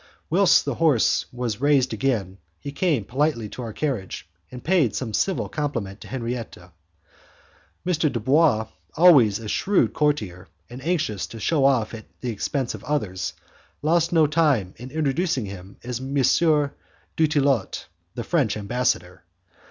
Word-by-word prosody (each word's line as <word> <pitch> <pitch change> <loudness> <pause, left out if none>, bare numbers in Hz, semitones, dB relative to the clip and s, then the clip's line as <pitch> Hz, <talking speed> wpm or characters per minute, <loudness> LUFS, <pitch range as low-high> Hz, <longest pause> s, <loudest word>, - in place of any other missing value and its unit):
Whilst 195 +3 +5
the - - -1
horse 150 -9 +3
was 120 -2 -4
raised 140 -3 +3
again, 100 -8 -1 0.2
he 140 - -6
came 145 - 0
politely 130 -3 0
to 125 - -8
our 115 -2 -5
carriage, 110 - -3 0.2
and 125 +4 -10
paid 165 - +2
some 115 -5 -3
civil 190 - 0
compliment 115 -10 -4
to - - -10
Henriette. 120 -2 -4
M. 90 0 -17 1.4
Dubois, 130 0 +3 0.3
always 145 - +6
a 115 - -8
shrewd 195 - +1
courtier 105 - -1 0.2
and 130 +2 -9
anxious 155 - -1
to 115 - -10
shew 145 +5 +1
off 130 -6 +2
at 110 -2 -8 0.2
the 125 - -2
expense 125 +4 -2
of - - -9
others, 95 - -2 0.5
lost 165 +2 +2
no 165 -2 +5
time 145 - +1
in 125 +3 -9
introducing 150 - 0
him 95 0 -10
as 120 0 -4
M. 135 +2 -5
Dutillot, 145 - +1 0.3
the 120 - -4
French 135 - +1
ambassador. 100 -5 -2
130 Hz, 145 wpm, -24 LUFS, 110-150 Hz, 1.4 s, always